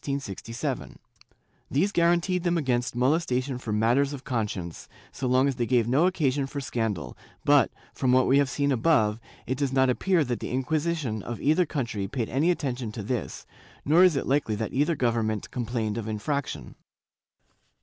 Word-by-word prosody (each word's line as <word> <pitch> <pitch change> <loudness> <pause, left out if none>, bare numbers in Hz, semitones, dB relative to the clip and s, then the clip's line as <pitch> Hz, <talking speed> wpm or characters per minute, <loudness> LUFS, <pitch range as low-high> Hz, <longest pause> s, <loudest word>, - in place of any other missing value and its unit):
^ 115 -5 -4 0.7
These 185 +9 +1
guaranteed 175 +1 +2
them 175 0 +1
against 125 -6 0
molestation 130 -1 0
for 115 - -5
matters 120 +7 +2
of 140 -2 -7
con 120 -6 -1
science, 85 -5 -7 0.2
so 130 - -3
long 130 +2 +3
as 135 -3 -1
they 120 -2 -1
gave 120 -3 +2
no 140 +9 +3
occasion 140 -6 0
for 140 +1 -5
scandal, 115 -8 -3 0.3
but, - - +5 0.2
from 130 - +1
what 130 0 +5
we 135 +2 +4
have 140 -2 +2
seen 140 +2 0
above, 115 -5 +2 0.3
it 130 +1 -3
does 140 -2 0
not 130 -1 +3
appear 180 +5 +2
that 120 -3 -3
the - - -5
Inquisition 145 -3 -1
of 120 +3 -6
either 155 +4 +2
country 120 -10 -3
paid 120 -3 -3
any 145 +8 +1
attention 130 -9 -2
to 110 - -5
this, 115 -2 -4 0.4
nor 160 +5 +6
is 180 -4 +5
it 135 - -1
likely 135 -5 +1
that 110 0 -4
either 150 +5 +2
government 115 -4 -1
complained 115 -2 -2
of 110 - -6
infraction. 110 - -3
130 Hz, 175 wpm, -26 LUFS, 115-145 Hz, 0.7 s, nor